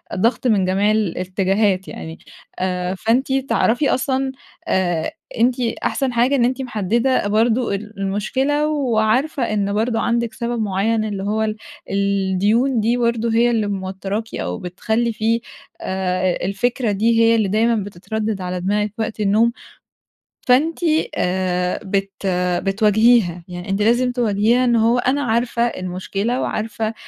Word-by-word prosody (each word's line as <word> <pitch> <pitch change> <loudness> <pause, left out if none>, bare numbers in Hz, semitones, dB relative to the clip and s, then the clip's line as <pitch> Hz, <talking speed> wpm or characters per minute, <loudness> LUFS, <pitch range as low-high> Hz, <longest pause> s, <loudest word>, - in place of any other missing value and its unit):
ضغط 235 +5 +1
من 205 -5 +3
جميع 195 +3 +2
الاتجاهات 190 0 0
يعني، 160 0 -8 0.4
آآ، 180 0 -1
فأنتِ 245 +7 +1
تعرفي 270 0 +1
أصلًا 265 +1 0 0.4
آآ 175 -4 0 0.3
أنتِ 245 +2 +2
أحسن 250 +2 -1
حاجة 245 +4 +3
إن 240 -3 +3
أنتِ 260 +2 -1
محدّدة 235 +1 0
برضه 225 +1 +1
ال 210 0 -8
المشكلة 265 +10 0
وعارفة 260 0 +1
إن 200 -1 0
برضه 225 +2 0
عندِك 235 -1 0
سبب 235 -1 -3
معيّن، 215 +2 0
اللي 200 -2 -4
هو 215 +2 -1
ال 215 -1 -1 0.3
الديون 200 +5 +1
دي 230 +3 +1
برضه 235 -1 0
هي 240 +1 +3
اللي 220 -3 0
موتّراكِ 195 +2 -4
أو 90 0 -3
بتخلّي 220 +6 -1
فيه 225 +1 0 0.4
آآ 185 -1 -1
الفكرة 240 +3 0
دي 225 +3 +2
هي 230 0 +5
اللي 215 -3 +1
دايمًا 225 +4 +2
بتتردّد 210 +2 -4
على 180 0 -3
دماغِك 210 +2 0
وقت 220 0 -3
النوم. 215 +3 +3 1.0
فأنتِ 295 +7 +3 0.4
آآ 180 0 0
بت 195 0 -1 0.5
بتواجهيها، 210 -2 +3
يعني 175 +1 -8
أنتِ 195 +1 0
لازم 240 +3 +3
تواجهيها 235 +1 +2
إن 240 -1 +3
هو 230 +2 +3
أنا 270 +4 +1
عارفة 235 +1 0
المشكلة 195 +3 -2
وعارفة 220 0 -2
220 Hz, 135 wpm, -20 LUFS, 195-235 Hz, 1.0 s, هي